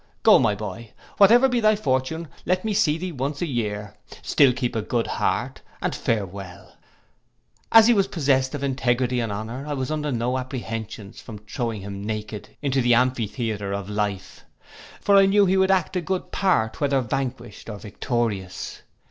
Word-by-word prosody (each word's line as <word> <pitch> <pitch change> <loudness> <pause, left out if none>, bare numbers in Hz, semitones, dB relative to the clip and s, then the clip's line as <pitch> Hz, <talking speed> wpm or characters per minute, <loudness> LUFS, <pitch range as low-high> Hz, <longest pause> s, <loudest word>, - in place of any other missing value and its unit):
Go, - - +7
my 105 - +2
boy, 105 +2 -7 0.2
whatever 235 +6 +7
be 250 -2 +1
thy 215 -1 +4
fortune 160 -1 -1 0.2
let 185 +3 0
me 215 - 0
see 165 -7 +2
thee 180 +2 -4
once 140 0 -3
a - - 0
year; 105 -6 -3 0.3
still 140 -3 +4
keep 125 -1 -2
a 110 - 0
good 115 +2 -1
heart, - - -2 0.2
and - - -2
farewell.' 100 -4 -4 1.0
As 225 -1 +9
he 240 - +6
was 195 -3 +2
possest 140 -7 +1
of 140 - -5
integrity 125 -2 0
and 115 -3 -2
honour, 110 +6 -5
I 150 - -2
was 130 +1 -3
under 150 -1 -2
no 125 +1 0
apprehensions 115 -5 -6
from 110 -4 -9
throwing 110 0 -4
him 100 0 -7
naked 105 0 -5
into 135 -1 +1
the 120 -1 +4
amphitheatre 110 -4 -1
of 100 0 -4
life; 105 -2 -3 0.6
for 200 -1 +4
I 195 0 +6
knew 200 +1 +5
he 190 0 +2
would 190 0 +3
act 190 -1 +1
a 180 - +1
good 185 +2 -3
part 110 - +1
whether 140 -1 +2
vanquished 120 -2 -4
or 105 - -5
victorious. 105 -2 -3
125 Hz, 175 wpm, -24 LUFS, 110-155 Hz, 1.0 s, As